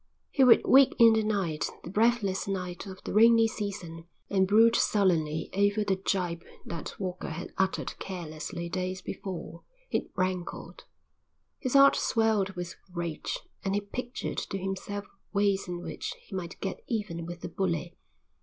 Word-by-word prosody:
He 270 - +4
would 250 -2 +7
wake 270 0 +6
in 230 -2 +8
the 220 - +3
night, 195 -8 -1
the 175 - -7
breathless 215 -3 +2
night 180 -1 -4
of 190 0 -9
the - - -4
rainy 225 +1 +6
season, 180 -6 -5 0.2
and 190 -1 +3
brood 225 +3 +6
sullenly 165 -6 +2
over 205 +2 +2
the 195 -2 +1
gibe 180 -3 -1 0.2
that 165 -3 -6
Walker 185 -2 -4
had 165 +3 -6
uttered 190 0 -1
carelessly 170 -2 -5
days 185 +1 -3
before. 175 -3 -6 0.3
It - - -1
rankled. 185 -1 -3 0.7
His 255 -1 -2
heart 275 0 +8
swelled 220 -4 +1
with 175 0 -6
rage, 170 -3 -3 0.2
and 195 0 0
he 205 - +1
pictured 245 +5 -4
to 195 - -4
himself 195 +2 -4 0.3
ways 200 -1 +2
in 175 0 -5
which - - -5
he 195 - -9
might 180 -2 -5
get 195 - -3
even 195 -8 -3
with 175 0 -7
the - - -5
bully. 175 -2 -2
190 Hz, 155 wpm, -29 LUFS, 175-210 Hz, 0.7 s, in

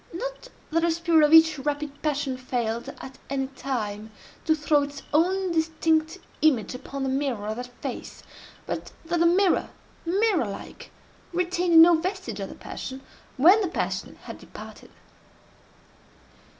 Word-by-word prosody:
Not - - -6 0.2
that 330 +1 +2
the 340 - +2
spirit 330 -1 +3
of - - -4
each 320 -2 +7
rapid 290 +1 -3
passion 290 -3 -1
failed, 245 -1 -3
at 265 0 -10
any 270 -1 -1
time, 225 -6 -4 0.4
to 315 - +3
throw 300 -1 +2
its 285 0 -6
own 370 +4 +2
distinct 320 0 +1 0.2
image 270 -9 +2
upon 270 +2 -6
the 265 - 0
mirror 265 -6 -1
of 215 +1 -3
that 250 0 -6
face—but - - -8
that 345 +1 -1
the 340 - +5
mirror, 370 +2 +3 0.3
mirror 375 - +1
like, 200 - -9 0.4
retained 350 -1 +3
no 345 +1 +7
vestige 370 +4 -2
of - - -4
the - - -9
passion, 265 0 -7 0.4
when 360 +11 +7
the 390 - 0
passion 345 - -3
had - - -9
departed. - - -12
310 Hz, 145 wpm, -25 LUFS, 265-340 Hz, 0.4 s, each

